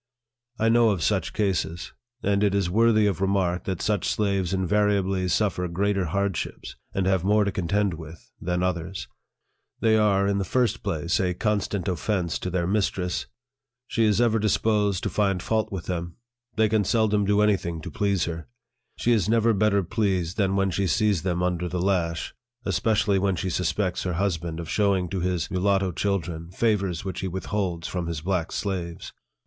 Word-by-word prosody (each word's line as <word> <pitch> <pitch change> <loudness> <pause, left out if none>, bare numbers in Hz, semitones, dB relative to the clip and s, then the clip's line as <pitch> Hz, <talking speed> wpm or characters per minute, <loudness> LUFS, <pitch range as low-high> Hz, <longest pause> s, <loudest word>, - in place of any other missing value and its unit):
I 115 - +2
know 115 0 +5
of 95 -6 0
such - - +1
cases; 90 -5 -2 0.3
and 100 0 +2
it 100 -1 +2
is 95 -3 0
worthy 110 +1 +4
of 95 -4 0
remark 95 -2 +1
that 95 -2 -3
such 105 -2 0
slaves 100 -4 0
invariably 95 -1 +1
suffer 90 -1 0
greater 95 +2 0
hardships, 100 +1 -3 0.2
and 95 - -1
have 95 -2 +2
more 105 +2 +3
to 100 - 0
contend 95 +2 0
with, 80 0 -11
than 90 +1 -1
others. 90 0 -3 0.7
They 110 -1 +3
are, 100 -2 +3
in 100 0 +1
the - - 0
first 115 +2 0
place, 85 -4 -1
a 90 -2 0
constant 100 -2 -1
offence 90 -1 -1
to 90 - -3
their 90 -1 0
mistress. 95 -2 -1 0.6
She 115 -2 +1
is 105 0 +3
ever 115 -2 +3
disposed 105 -2 +1
to - - 0
find 100 -3 +1
fault 110 0 0
with 95 -3 -5
them; 85 -2 -4 0.4
they 110 -1 +3
can 105 0 +2
seldom 105 0 +2
do 105 +1 +3
any 105 -1 +4
thing 85 -3 -5
to - - -7
please 100 -3 0
her; 85 -1 -5 0.5
she 120 - +1
is 110 -5 +2
never 115 0 +3
better 100 -1 +2
pleased 95 -3 -1
than 95 -2 +1
when 95 -1 +1
she 95 +2 0
sees 100 +1 +2
them 90 -1 -1
under 90 -1 -1
the 90 +1 -2
lash, 85 -3 0 0.3
especially 105 -3 +2
when 95 0 +1
she 95 +1 -2
suspects 90 +2 -1
her 90 - -2
husband 85 -3 -2
of 85 - -6
showing 95 -3 +1
to 95 - -2
his 90 -2 -1
mulatto 95 0 +1
children 85 -3 -2
favors 100 -3 0
which 95 - -4
he 95 - -2
withholds 95 -2 -3
from 90 -2 -3
his 85 -3 -3
black 90 -1 -1
slaves. 90 -4 -4
95 Hz, 180 wpm, -25 LUFS, 90-105 Hz, 0.7 s, know